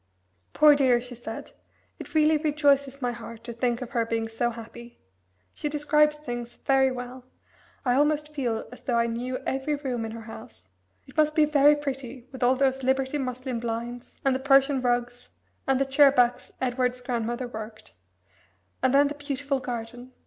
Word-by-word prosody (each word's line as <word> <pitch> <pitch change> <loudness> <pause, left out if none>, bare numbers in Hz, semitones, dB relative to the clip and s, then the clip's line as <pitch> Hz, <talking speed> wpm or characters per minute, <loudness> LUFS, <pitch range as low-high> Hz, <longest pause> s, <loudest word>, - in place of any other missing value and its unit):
"Poor 300 -1 +7
dear!" 260 -4 +4
she 245 +1 -8
said. 225 -2 -8 0.5
"It - - -10
really 310 0 +5
rejoices 285 -3 +1
my 245 - +1
heart 230 -1 -9
to 235 0 -6
think 240 +1 -1
of 245 - -10
her 235 -4 +1
being 225 0 -2
so 225 +2 -1
happy. 235 +1 -10 0.5
She 295 - -3
describes 300 0 +3
things 240 -5 -6
very 270 -1 +4
well. 250 0 -7 0.6
I 245 - +3
almost 300 +2 +1
feel 240 -6 -2
as 250 0 -12
though 245 -2 0
I 235 - +3
knew 245 +2 -3
every 270 +3 -1
room 260 -5 -3
in 225 - -4
her 230 - -7
house; 220 - -12 0.4
it 265 - -17
must 305 0 +2
be 310 - +5
very 295 0 +5
pretty 270 -3 -5
with 260 - -10
all 250 +1 +4
those 265 0 +1
Liberty 265 +2 0
muslin 255 -1 -3
blinds, 235 +1 -5
and 270 - +4
the 260 - -1
Persian 275 0 +4
rugs, 245 0 -1 0.4
and 270 -1 +3
the 275 - +2
chair 275 +1 +6
backs 245 -2 +1
Edward's 250 0 0
grandmother 240 0 -2
worked 220 -2 -9 0.9
and 260 +1 +3
then 285 +1 +6
the 290 - -4
beautiful 285 -1 -3
garden. 245 0 -6
255 Hz, 180 wpm, -26 LUFS, 240-280 Hz, 0.9 s, Poor